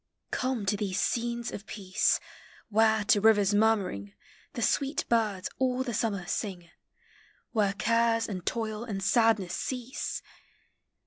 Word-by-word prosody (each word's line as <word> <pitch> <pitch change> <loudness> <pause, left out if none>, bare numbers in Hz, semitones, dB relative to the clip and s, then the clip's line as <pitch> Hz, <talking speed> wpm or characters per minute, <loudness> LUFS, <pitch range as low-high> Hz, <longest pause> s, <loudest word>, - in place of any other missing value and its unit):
COMI 255 -5 -1
to 200 +1 +1
these 195 -2 -2
scenes 235 0 -1
Of 205 +1 -8
peace, 190 -3 +1 0.5
Where, 220 0 +3
to 205 0 +3
rivers 205 -2 +5
murmuring, 200 - +1 0.4
The 240 -5 -3
sweet 280 +4 0
birds 215 -5 +1
all 260 0 +1
Hie 250 - -3
summer 205 -4 -1
sin. 180 -3 -4 0.8
Where 205 -3 +2
cares 230 +1 +2
and 190 -4 -4 0.2
(oil 220 -1 -3
and 200 -5 -4
sadness 220 -3 +3
cease! 255 0 -4
220 Hz, 130 wpm, -29 LUFS, 200-235 Hz, 0.8 s, rivers